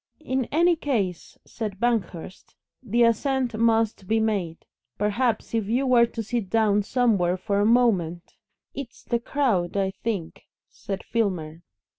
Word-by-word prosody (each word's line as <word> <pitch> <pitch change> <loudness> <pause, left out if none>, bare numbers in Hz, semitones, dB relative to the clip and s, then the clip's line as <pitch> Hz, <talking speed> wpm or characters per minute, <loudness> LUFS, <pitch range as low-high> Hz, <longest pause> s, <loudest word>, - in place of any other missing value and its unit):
"In 260 -4 -1
any 340 +6 +3
case," 220 - -2
said 210 -4 -6
Banghurst, 210 -6 -2 0.3
"the 235 -1 +2
ascent 250 +2 +1
must 225 -3 +1
be 225 +2 +2
made. 200 -7 -2 0.3
Perhaps 225 +4 0
if 225 -3 0
you 245 +5 +1
were 240 -2 +5
to 230 -1 -5
sit 220 -3 -3
down 210 -2 +3
somewhere 200 -6 +1
for 200 +2 -1
a 205 - +3
moment 195 -8 +2 0.2
" - - -60
"It's 275 -4 -8
the 235 - -1
crowd, 225 -9 0
I 190 -1 +1
think," 195 -4 -5 0.2
said 195 -1 -6
Filmer. 175 -8 -2
225 Hz, 145 wpm, -25 LUFS, 195-240 Hz, 0.3 s, were